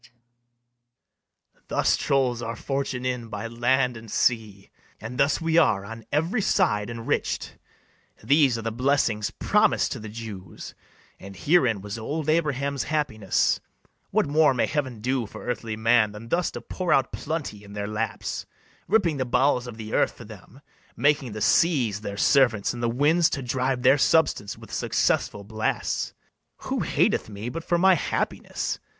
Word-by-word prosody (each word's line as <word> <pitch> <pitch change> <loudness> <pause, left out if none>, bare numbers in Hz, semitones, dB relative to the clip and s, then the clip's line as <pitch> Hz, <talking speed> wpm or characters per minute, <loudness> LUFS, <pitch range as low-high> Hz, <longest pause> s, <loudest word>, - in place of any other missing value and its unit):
[Exit.] - - -21 1.4
BARABAS. - - -35
Thus - - +2
trolls 130 -3 +1
our 115 0 -4
fortune 135 0 -3
in 125 -2 -2
by 105 -1 -5
land 120 +2 +1
and 115 0 -10
sea, 110 -5 0 0.3
And 115 +3 -7
thus 140 +1 +3
are 165 - -7
we 165 0 +4
on 110 -4 0
every 165 +10 +1
side 135 - +1
enrich'd: 115 -1 -3 0.6
These 140 -4 +4
are 115 - -6
the 115 - -2
blessings 120 -4 +1
promis'd - - +2
to - - -4
the 110 - -8
Jews, 105 -5 -8 0.5
And 100 0 -10
herein 125 - +2
was 105 +3 -6
old 150 +7 -3
Abraham's 140 -4 0
happiness: 130 -11 0 0.5
What - - +2
more 145 -1 +3
may - - +2
heaven 130 -7 -3
do 125 -1 -1
for - - -10
earthly 115 -2 -3
man 110 -1 +3
Than 110 +2 -10
thus 175 +5 +1
to - - -6
pour 180 -2 -3
out 135 -1 +3
plenty 145 -10 -4
in 100 0 -12
their 105 0 -3
laps, 110 0 -3 0.4
Ripping 180 -8 +2
the 130 - -1
bowels 125 0 +2
of 115 -2 -8
the 110 -1 -7
earth - - +2
for 120 - -12
them, 110 +5 -14 0.3
Making 145 -5 +1
the 110 - -6
sea[s] 120 - +3
their 100 -1 -5
servants, 120 -5 +3
and 120 - -6
the 120 - +1
winds 150 +7 +3
To 135 - -3
drive 130 0 -1
their 135 +3 +5
substance 145 -10 +2
with - - -13
successful 105 - 0
blasts? 110 +2 -2 0.5
Who - - -2
hateth - - +1
me 105 +3 -6
but 165 +5 -6
for 175 - +1
my 190 +2 +5
happiness? 170 - -2
125 Hz, 165 wpm, -25 LUFS, 110-145 Hz, 1.4 s, their